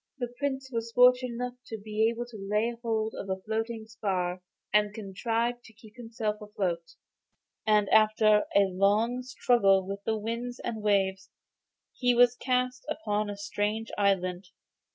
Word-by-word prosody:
The 245 -2 -4
Prince 270 -2 -2
was 230 -1 -3
fortunate 250 0 +5
enough 250 +1 -3
to 225 - -5
be 215 +1 0
able 235 +1 -4
to 240 -2 -13
lay 210 +4 -1
hold 220 -2 -1
of 195 - -7
a 190 0 -2
floating 220 +2 -3
spar, 185 -4 -2 0.3
and 210 0 +3
contrived 230 +4 -2
to 225 - -15
keep 220 0 -17
himself 225 -3 -4
afloat; 185 -5 -3 0.7
and, 210 -1 +4
after 215 -1 +4
a 200 - +7
long 200 +6 +2
struggle 230 -6 +3
with 200 +1 -6
the 220 +1 0
winds 235 +3 -4
and 225 -2 -4
waves, 195 -2 +1 0.6
he 245 -1 +2
was 245 0 +5
cast 250 0 -1
upon 210 -9 -1
a 205 - -5
strange 205 +2 -2
island. 190 -2 +1
220 Hz, 155 wpm, -28 LUFS, 200-240 Hz, 0.7 s, a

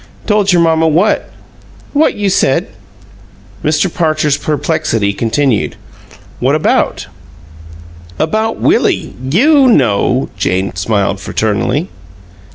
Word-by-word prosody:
"Told 210 -2 +2
your 175 -1 +3
mamma 160 0 +2
what?" 170 +7 +1 0.6
"What 300 +2 +2
you 200 -2 -1
said." 135 -7 +1 0.9
Mr. 155 +4 +1
Parcher's 155 -3 +1
perplexity 145 -8 -1
continued. 115 +3 0 0.6
"What - - +1
about?" - - 0 1.1
"About 220 - -1
Willie. - - +1 0.2
YOU 275 - +4
know!" 130 - +2
Jane 95 0 -1
smiled 100 +1 -1
fraternally. 110 - -1
155 Hz, 95 wpm, -13 LUFS, -, 1.1 s, YOU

